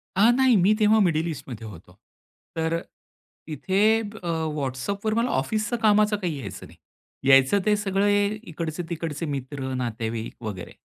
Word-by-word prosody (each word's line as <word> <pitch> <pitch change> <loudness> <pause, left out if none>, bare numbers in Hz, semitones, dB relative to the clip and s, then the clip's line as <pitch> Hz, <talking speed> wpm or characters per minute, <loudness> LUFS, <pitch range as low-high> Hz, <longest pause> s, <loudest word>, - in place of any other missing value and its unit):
अ, 205 +5 +5
नाही, 255 0 +4
मी 195 +2 +4
तेव्हा 215 +1 +5
मिडल 165 -4 +2
ईस्टमध्ये 135 -8 -7
होतो. 90 -2 -13 0.6
तर 165 +1 0 0.7
तिथे 165 +5 -2 0.2
अ, 210 -4 -7 0.3
WhatsAppवर 175 +11 -2
मला 230 +3 +1
ऑफिसचं 215 -1 -1
कामाचं 210 0 +4
काही 175 -7 -3
यायचं 100 -6 -8
नाही, - - -18 0.5
यायचं 135 +8 +6
ते 210 -1 +4
सगळे 205 0 +2 0.2
इकडचे-तिकडचे 165 -2 -4
मित्र, 135 -2 -4
नातेवाईक 115 -2 -4
वगैरे. 100 -5 -6
165 Hz, 135 wpm, -25 LUFS, 130-205 Hz, 0.7 s, यायचं